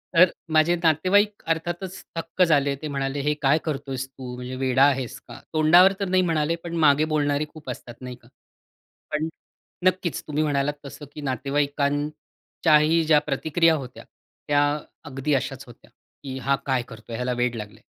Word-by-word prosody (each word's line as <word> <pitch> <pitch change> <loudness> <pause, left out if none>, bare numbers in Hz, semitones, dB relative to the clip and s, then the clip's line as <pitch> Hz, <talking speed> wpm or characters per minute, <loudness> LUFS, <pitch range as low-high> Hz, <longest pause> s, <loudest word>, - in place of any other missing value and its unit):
तर, 180 +1 +7 0.2
माझे 155 +3 +4
नातेवाईक 195 +6 +2
अर्थातच 175 +3 -3
थक्क 165 +2 -4
झाले. 145 -4 +3
ते 155 - -4
म्हणाले 135 -1 -2
"हे 150 - +3
काय 140 +3 +5
करत 140 -2 -3
आहेस 130 0 -3
तू?" 130 -2 -9
म्हणजे, 125 +1 -6
"वेडा 130 +1 +3
आहेस 130 -1 -3
का?" - - -10
तोंडावर 170 +5 +6
तर 200 - -1
नाही 185 0 +3
म्हणाले 160 0 +1
पण 170 0 -4
मागे 145 +1 +5
बोलणारे 145 0 +1
खूप 155 -4 -11
असतात, 120 -1 -7
नाही 125 -1 -7
का? - - -21 0.9
पण 155 +1 0 0.6
नक्कीच 180 -2 -4
तुम्ही 150 0 0
म्हणालात 145 -1 0
तसं 145 +2 -9
की 150 - -8
नातेवाईकांच्याही 145 +3 0
ज्या 150 - +7
प्रतिक्रिया 160 +4 +2
होत्या. 125 - -11 0.4
त्या 145 0 +3 0.5
अगदी 135 +2 -2
अशाच 135 0 -2
होत्या, 120 - -16 0.3
की 130 -2 -5
"हा 140 - +4
काय 130 -2 +1
करत 110 -1 -11
आहे? 115 - -4
ह्याला 125 +1 -1
वेड 120 -1 0
लागलं 105 -2 -8
आहे." - - -30
145 Hz, 170 wpm, -24 LUFS, 135-160 Hz, 0.9 s, तर